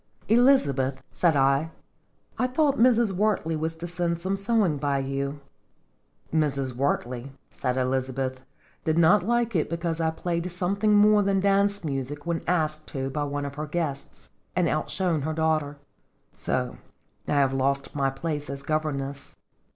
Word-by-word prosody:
" - - -31
Elizabeth," 140 - +3
said 170 -4 +2
I, 140 +3 +3 0.3
" - - -31
I 255 - +2
thought 280 +2 +1
Mrs. 235 -3 +4
Wert 205 -1 +1
ley 165 0 -1
was 160 +1 -2
to 170 +2 -6
send 170 -1 -1
some 190 +3 -1
sewing 200 -5 +1
by 140 0 0
you." 140 +1 -3 0.9
"Mrs. 140 -4 0
Wertley," 130 0 -2 0.2
said 125 -1 -2
Elizabeth, 130 0 -1 0.4
"did 160 0 +1
not 170 +5 +6
like 235 +2 0
it 160 - +1
because 170 0 -2
I 160 - +2
played 170 +2 -3
something 200 +4 +1
more 210 0 +6
than 195 -1 +2
dance 200 0 +2
music 145 0 -4
when 170 -1 -1
asked 155 -3 0
to 135 0 -4
by 145 +2 -1
one 145 0 -3
of 140 - -5
her 150 +2 -5
guests, 140 - -4 0.2
and 180 -1 +2
outshone 160 +1 0
her 155 +3 -2
daughter. 155 -2 0 0.6
So 125 -1 -2 0.5
I - - 0
have 140 -2 +3
lost 135 +1 0
my 135 -2 +1
place 145 +1 -4
as 140 0 -6
governess." 140 -3 -3
155 Hz, 160 wpm, -26 LUFS, 140-180 Hz, 0.9 s, not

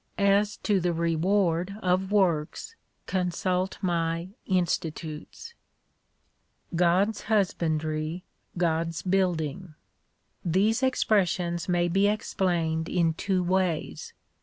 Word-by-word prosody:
As 200 +1 +2
to 205 -3 +2
the 175 -1 0
reward 170 +3 +1
of 185 +1 +1
works, 190 - 0 0.3
consult 185 0 -1
my 170 -1 -1 0.2
Institutes} 170 - -2 1.2
God's 180 +5 +2
husbandry, 160 -5 0 0.3
God's 165 -1 0
building. 180 -3 -1 0.7
These 200 +8 +2
expressions 185 -9 +1
may 175 -1 +2
be 195 +4 +3
explained 175 -6 0
in 170 -3 +2
two 185 +2 0
ways. 180 -2 -1
180 Hz, 85 wpm, -27 LUFS, 165-195 Hz, 1.2 s, be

